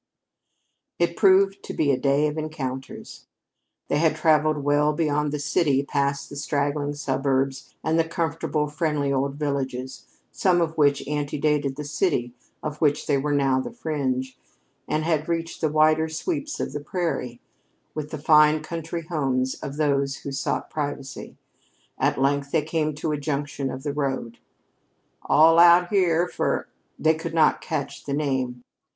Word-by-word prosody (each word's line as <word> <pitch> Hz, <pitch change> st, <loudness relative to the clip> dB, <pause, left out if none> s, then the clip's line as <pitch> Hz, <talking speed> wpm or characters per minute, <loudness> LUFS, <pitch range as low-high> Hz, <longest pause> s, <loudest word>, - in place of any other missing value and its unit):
It 170 Hz, 0 st, +1 dB
proved 195 Hz, -1 st, +4 dB
to -, -, -7 dB
be 145 Hz, -3 st, +2 dB
a 130 Hz, -, +1 dB
day 140 Hz, +2 st, +2 dB
of 150 Hz, -, -3 dB
encounters. 140 Hz, -5 st, -6 dB, 0.6 s
They 145 Hz, -, +1 dB
had 160 Hz, -1 st, +3 dB
traveled 155 Hz, -1 st, +2 dB
well 145 Hz, +1 st, +3 dB
beyond 150 Hz, -1 st, 0 dB
the 150 Hz, -, -2 dB
city, 145 Hz, -2 st, +1 dB
past 140 Hz, 0 st, -1 dB
the -, -, -10 dB
straggling 145 Hz, 0 st, -1 dB
suburbs 135 Hz, -1 st, -1 dB
and 160 Hz, +1 st, +1 dB
the -, -, +5 dB
comfortable, 160 Hz, -2 st, -1 dB
friendly 150 Hz, -2 st, -1 dB
old 135 Hz, +1 st, -1 dB
villages, 135 Hz, -3 st, -3 dB, 0.2 s
some 180 Hz, -2 st, +2 dB
of 165 Hz, -1 st, 0 dB
which 145 Hz, -3 st, +2 dB
antedated 145 Hz, -1 st, 0 dB
the 150 Hz, -, -5 dB
city 145 Hz, -5 st, -1 dB, 0.3 s
of 150 Hz, -1 st, -5 dB
which 150 Hz, -2 st, +2 dB
they 145 Hz, -, +2 dB
were 145 Hz, +2 st, -1 dB
now 135 Hz, -2 st, +2 dB
the -, -, -5 dB
fringe, 130 Hz, -, -3 dB, 0.5 s
and 155 Hz, -, 0 dB
had 160 Hz, -1 st, 0 dB
reached 165 Hz, 0 st, -3 dB
the 155 Hz, -, +2 dB
wider 155 Hz, +1 st, +3 dB
sweeps 295 Hz, -, -3 dB
of -, -, -3 dB
the 145 Hz, -, -3 dB
prairie, 145 Hz, -7 st, -3 dB, 0.5 s
with 150 Hz, -1 st, -5 dB
the 155 Hz, -, -5 dB
fine 150 Hz, +1 st, +5 dB
country 165 Hz, +1 st, -5 dB
homes 135 Hz, -6 st, -1 dB
of 140 Hz, +1 st, -6 dB
those 140 Hz, -2 st, +1 dB
who 140 Hz, -, -3 dB
sought 135 Hz, -, -2 dB
privacy. 145 Hz, -3 st, -5 dB, 0.6 s
At -, -, +1 dB
length 140 Hz, +1 st, +1 dB
they 155 Hz, 0 st, +1 dB
came 155 Hz, -1 st, -1 dB
to 155 Hz, +1 st, -2 dB
a 150 Hz, -, -2 dB
junction 145 Hz, -2 st, -3 dB
of 130 Hz, +1 st, -6 dB
the 145 Hz, -1 st, -2 dB
road. 135 Hz, -5 st, -3 dB, 0.9 s
"All 160 Hz, +4 st, +6 dB
out 175 Hz, +1 st, +7 dB
here 180 Hz, -3 st, +2 dB
for -, -, -1 dB, 0.2 s
" -, -, -45 dB
They 160 Hz, 0 st, +3 dB
could 160 Hz, +1 st, -5 dB
not 155 Hz, -2 st, +4 dB
catch 155 Hz, -5 st, -4 dB
the 140 Hz, -, -3 dB
name. 130 Hz, -4 st, -2 dB
150 Hz, 160 wpm, -24 LUFS, 140-160 Hz, 0.9 s, out